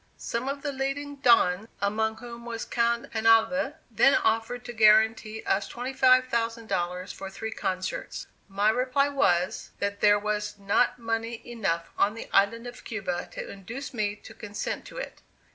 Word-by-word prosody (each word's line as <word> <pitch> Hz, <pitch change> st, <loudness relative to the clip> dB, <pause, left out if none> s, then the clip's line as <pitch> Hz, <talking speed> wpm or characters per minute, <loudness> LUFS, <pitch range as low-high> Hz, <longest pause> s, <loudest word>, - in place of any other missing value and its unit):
Some 235 Hz, +3 st, -3 dB
of 280 Hz, 0 st, -4 dB
the 290 Hz, -, -1 dB
leading 280 Hz, +2 st, -3 dB
Dons, 225 Hz, -6 st, +4 dB
among 220 Hz, +2 st, 0 dB
whom 235 Hz, -1 st, -9 dB
was 230 Hz, -1 st, -5 dB
Count 235 Hz, 0 st, 0 dB
Penalver, 225 Hz, +6 st, +3 dB, 0.2 s
then 275 Hz, +5 st, +5 dB
offered 230 Hz, +2 st, 0 dB
to 240 Hz, -, -6 dB
guarantee 220 Hz, 0 st, +4 dB
us 195 Hz, 0 st, 0 dB
$25,000 230 Hz, -8 st, +1 dB
for 195 Hz, -, -7 dB
three 220 Hz, +3 st, -6 dB
concerts. 185 Hz, -3 st, -3 dB, 0.2 s
My 205 Hz, +2 st, +2 dB
reply 255 Hz, +4 st, +1 dB
was, 185 Hz, -11 st, +1 dB
that 200 Hz, 0 st, -3 dB
there 205 Hz, 0 st, +6 dB
was 210 Hz, 0 st, -2 dB
not 200 Hz, +5 st, +2 dB
money 230 Hz, 0 st, -3 dB
enough 195 Hz, -8 st, -2 dB
on 210 Hz, +2 st, +3 dB
the 230 Hz, -, -7 dB
island 230 Hz, +4 st, +3 dB
of 245 Hz, -, -9 dB
Cuba 195 Hz, -5 st, -4 dB
to -, -, -6 dB
induce 230 Hz, +9 st, -7 dB
me 210 Hz, -3 st, -1 dB
to 205 Hz, -, -13 dB
consent 205 Hz, -1 st, -5 dB
to -, -, -11 dB
it. -, -, -7 dB
225 Hz, 155 wpm, -27 LUFS, 205-245 Hz, 0.2 s, there